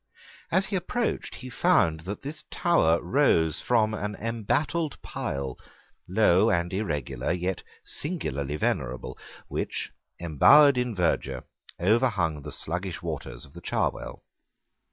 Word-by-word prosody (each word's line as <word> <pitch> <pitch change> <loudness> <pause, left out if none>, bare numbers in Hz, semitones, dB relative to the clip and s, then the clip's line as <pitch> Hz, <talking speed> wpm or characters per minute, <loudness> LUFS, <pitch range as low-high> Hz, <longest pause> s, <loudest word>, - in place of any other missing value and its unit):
As 185 +3 +3
he 195 - -3
approached 225 +6 -2
he 130 - -8
found 80 -7 +3
that 105 - -5
this 155 +3 -6
tower 85 - +3
rose 85 - +3
from 110 -3 +2
an 105 -1 -3
embattled 120 +9 -1
pile, 70 -2 -4 0.5
low 105 +1 +4
and 85 -2 0
irregular, 75 - -2
yet 90 +1 -1 0.2
singularly 75 - -3
venerable, 75 - -2 0.3
which, - - -3 0.3
embowered 135 - +6
in 125 -2 -1
verdure, 70 -7 0 0.4
overhung 95 - +2
the - - -8
slugish 90 +1 -3
waters - - -5
of 70 - -19
the - - -10
Cherwell. - - -2
100 Hz, 120 wpm, -27 LUFS, 80-130 Hz, 0.5 s, embowered